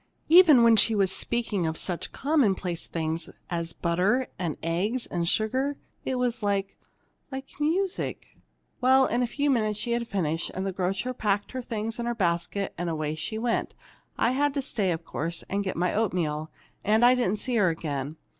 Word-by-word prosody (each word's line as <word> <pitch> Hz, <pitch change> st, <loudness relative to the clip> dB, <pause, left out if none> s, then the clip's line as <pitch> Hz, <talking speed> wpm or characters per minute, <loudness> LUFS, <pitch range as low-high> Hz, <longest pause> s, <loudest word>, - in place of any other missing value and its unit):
Even 320 Hz, -7 st, +8 dB
when 230 Hz, -1 st, +7 dB
she 220 Hz, +1 st, +4 dB
was 195 Hz, -2 st, +3 dB
speaking 210 Hz, -6 st, 0 dB
of 160 Hz, 0 st, -2 dB
such 175 Hz, -3 st, -4 dB
commonplace 200 Hz, -, 0 dB
things 160 Hz, 0 st, -3 dB, 0.2 s
as 170 Hz, -1 st, -2 dB
butter 185 Hz, +11 st, +1 dB
and 170 Hz, -5 st, -2 dB
eggs 195 Hz, +9 st, -1 dB
and 170 Hz, -1 st, -1 dB
sugar, 260 Hz, +6 st, 0 dB, 0.3 s
it 260 Hz, -, -1 dB
was 250 Hz, -1 st, 0 dB
like 200 Hz, -1 st, -1 dB, 0.6 s
like 265 Hz, 0 st, -6 dB
music! 360 Hz, +6 st, -1 dB, 0.5 s
"Well, 260 Hz, +1 st, +5 dB
in 240 Hz, 0 st, 0 dB
a 245 Hz, -, +1 dB
few 285 Hz, +4 st, 0 dB
moments 215 Hz, -5 st, +1 dB
she 235 Hz, -, -3 dB
had 235 Hz, 0 st, 0 dB
finished, 165 Hz, -5 st, -1 dB
and 190 Hz, -, -2 dB
the 195 Hz, -, -2 dB
grocer 190 Hz, +7 st, -1 dB
packed 205 Hz, -4 st, -1 dB
her 260 Hz, -, -4 dB
things 225 Hz, -1 st, -3 dB
in 235 Hz, -, -2 dB
her 240 Hz, -, -1 dB
basket, 180 Hz, 0 st, -1 dB
and 175 Hz, -, -2 dB, 0.3 s
she 220 Hz, +7 st, -4 dB
went 230 Hz, +1 st, -1 dB
away. -, -, -37 dB, 0.4 s
I 230 Hz, -, +3 dB
had 285 Hz, +2 st, +1 dB
to 280 Hz, -, +1 dB
stay, 210 Hz, -8 st, -1 dB
of 165 Hz, 0 st, -4 dB
course, 165 Hz, +2 st, -4 dB
and 200 Hz, +1 st, 0 dB
get 190 Hz, -4 st, -3 dB
my 180 Hz, +1 st, +1 dB
oatmeal, 165 Hz, -8 st, -1 dB, 0.3 s
and 220 Hz, +3 st, +4 dB
I 245 Hz, -, +7 dB
didn't 240 Hz, -5 st, +1 dB
see 245 Hz, +3 st, -1 dB
her 195 Hz, -5 st, +4 dB
again. 150 Hz, -2 st, -3 dB
210 Hz, 185 wpm, -27 LUFS, 175-245 Hz, 0.6 s, Even